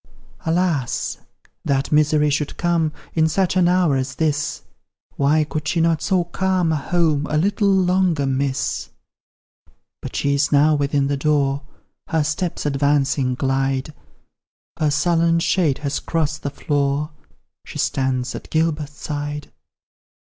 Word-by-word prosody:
Alas! 160 Hz, -6 st, 0 dB, 0.4 s
that 135 Hz, -1 st, 0 dB
Misery 150 Hz, 0 st, +3 dB
should 145 Hz, 0 st, -2 dB
come 170 Hz, -3 st, +1 dB, 0.2 s
In 160 Hz, -1 st, +3 dB
such 185 Hz, +2 st, +1 dB
an 180 Hz, -2 st, +4 dB
hour 180 Hz, -5 st, +3 dB
as 130 Hz, 0 st, -2 dB
this; 155 Hz, 0 st, -1 dB, 0.5 s
Why 150 Hz, +2 st, +3 dB
could 150 Hz, 0 st, -4 dB
she 165 Hz, -, 0 dB
not 165 Hz, -1 st, +2 dB
so 185 Hz, -3 st, +1 dB
calm 180 Hz, -1 st, 0 dB
a -, -, +1 dB
home 155 Hz, -1 st, 0 dB
A 150 Hz, -, +1 dB
little 200 Hz, +4 st, +2 dB
longer 180 Hz, -5 st, +2 dB
miss? 135 Hz, 0 st, -1 dB, 1.1 s
But -, -, -7 dB
she 140 Hz, -, +1 dB
is 140 Hz, +1 st, +1 dB
now 150 Hz, +1 st, +5 dB
within 145 Hz, -1 st, +1 dB
the 140 Hz, 0 st, -1 dB
door, 140 Hz, -1 st, +1 dB, 0.5 s
Her 160 Hz, -2 st, +1 dB
steps 160 Hz, +3 st, -2 dB
advancing 140 Hz, -2 st, +1 dB
glide; 135 Hz, +2 st, -1 dB, 0.9 s
Her 155 Hz, -, +2 dB
sullen 165 Hz, +2 st, +2 dB
shade 165 Hz, -4 st, +1 dB
has 140 Hz, +1 st, -1 dB
crossed 160 Hz, -1 st, -2 dB
the 140 Hz, -, -2 dB
floor, 145 Hz, +1 st, -1 dB, 0.5 s
She -, -, -9 dB
stands 130 Hz, -2 st, -1 dB
at -, -, -8 dB
Gilbert's 155 Hz, -2 st, -1 dB
side. 145 Hz, 0 st, -5 dB
150 Hz, 135 wpm, -21 LUFS, 140-165 Hz, 1.1 s, now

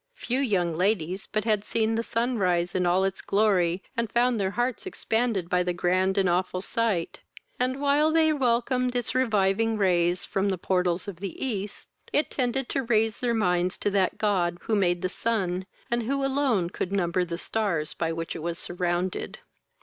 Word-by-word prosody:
Few 250 Hz, -, -2 dB
young 185 Hz, -11 st, +1 dB
ladies 185 Hz, +1 st, 0 dB
but 215 Hz, -1 st, 0 dB
had 215 Hz, -3 st, +1 dB
seen 225 Hz, 0 st, 0 dB
the 225 Hz, -, 0 dB
sun 235 Hz, +1 st, -1 dB
rise 175 Hz, -2 st, +1 dB
in 180 Hz, -1 st, +1 dB
all 180 Hz, +2 st, +3 dB
its 195 Hz, 0 st, -1 dB
glory, 195 Hz, -4 st, +2 dB
and 230 Hz, -3 st, -1 dB
found 240 Hz, -1 st, +2 dB
their 190 Hz, -1 st, +1 dB
hearts 245 Hz, -, -2 dB
expanded 225 Hz, -, -1 dB
by 180 Hz, +1 st, +2 dB
the 180 Hz, 0 st, 0 dB
grand 185 Hz, +2 st, +1 dB
and 195 Hz, -1 st, +3 dB
awful 180 Hz, +1 st, 0 dB
sight; 205 Hz, -4 st, -1 dB, 0.4 s
and, 255 Hz, +2 st, 0 dB
while 290 Hz, +2 st, +3 dB
they 315 Hz, -1 st, +4 dB
welcomed 250 Hz, -1 st, +1 dB
its 245 Hz, -2 st, -1 dB
reviving 225 Hz, -3 st, +2 dB
rays 180 Hz, -2 st, +2 dB
from 195 Hz, +1 st, 0 dB
the 190 Hz, -, -1 dB
portals 180 Hz, 0 st, 0 dB
of 195 Hz, -4 st, -6 dB
the 195 Hz, 0 st, -6 dB
east, 210 Hz, -5 st, -4 dB, 0.2 s
it 295 Hz, -, +1 dB
tended 255 Hz, 0 st, -1 dB
to 275 Hz, -, 0 dB
raise 225 Hz, -3 st, +1 dB
their 240 Hz, -2 st, 0 dB
minds 180 Hz, -3 st, +1 dB
to 205 Hz, -, -1 dB
that 195 Hz, -2 st, +1 dB
God 180 Hz, -5 st, +1 dB
who 225 Hz, -, 0 dB
made 175 Hz, -3 st, +1 dB
the -, -, +2 dB
sun, 190 Hz, -3 st, -2 dB, 0.2 s
and 235 Hz, 0 st, +2 dB
who 270 Hz, +4 st, -1 dB
alone 265 Hz, -10 st, +1 dB
could 185 Hz, -, -3 dB
number 180 Hz, -2 st, +1 dB
the 170 Hz, -1 st, -4 dB
stars 175 Hz, -7 st, -1 dB
by 165 Hz, -1 st, -2 dB
which 165 Hz, 0 st, -4 dB
it 165 Hz, -, -6 dB
was 170 Hz, +1 st, -3 dB
surrounded. 175 Hz, +1 st, -2 dB
200 Hz, 190 wpm, -26 LUFS, 180-235 Hz, 0.4 s, they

